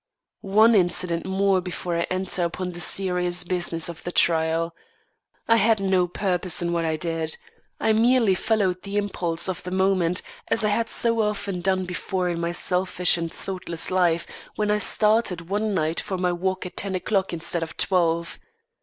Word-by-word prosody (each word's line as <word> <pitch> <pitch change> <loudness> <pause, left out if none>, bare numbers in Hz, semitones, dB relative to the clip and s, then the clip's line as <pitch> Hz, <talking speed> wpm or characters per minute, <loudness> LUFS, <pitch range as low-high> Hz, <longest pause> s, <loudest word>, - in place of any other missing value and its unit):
One 215 +4 +4
incident 175 -3 +1
more 190 0 +2
before 180 -1 -4
I 170 - -1
enter 185 -1 -1
upon 180 +2 -3
the 175 - -9
serious 180 -1 +2
business 175 -2 0
of 170 -2 -8
the 175 - -4
trial. 165 0 +2 0.7
I 230 - +5
had 225 0 +3
no 190 -2 +2
purpose 180 -1 -1
in 170 0 -1
what 170 -1 0
I 160 -1 0
did. 160 0 -3 0.4
I 220 - +2
merely 230 -2 +4
followed 190 -2 0
the 200 +2 -4
impulse 180 -5 -1
of 185 -2 -3
the 180 - -7
moment, 185 -2 +1 0.2
as 225 - +2
I - - +2
had 230 +2 0
so 230 -1 +2
often 205 -3 -2
done 190 0 0
before 180 +1 -2
in 170 -1 -2
my 170 0 -1
selfish 180 0 +1
and 165 -1 -3
thoughtless 180 -3 -3
life, 175 -2 +2 0.3
when 210 -1 0
I 210 - +2
started 210 -5 +1
one 210 +2 0
night 160 -3 0
for 190 - -4
my 180 -1 0
walk 185 +2 -2
at 180 - -8
ten 195 -1 0
o'clock 195 +1 -1
instead 170 0 -1
of 165 - -6
twelve. 170 -3 0
180 Hz, 180 wpm, -24 LUFS, 170-195 Hz, 0.7 s, I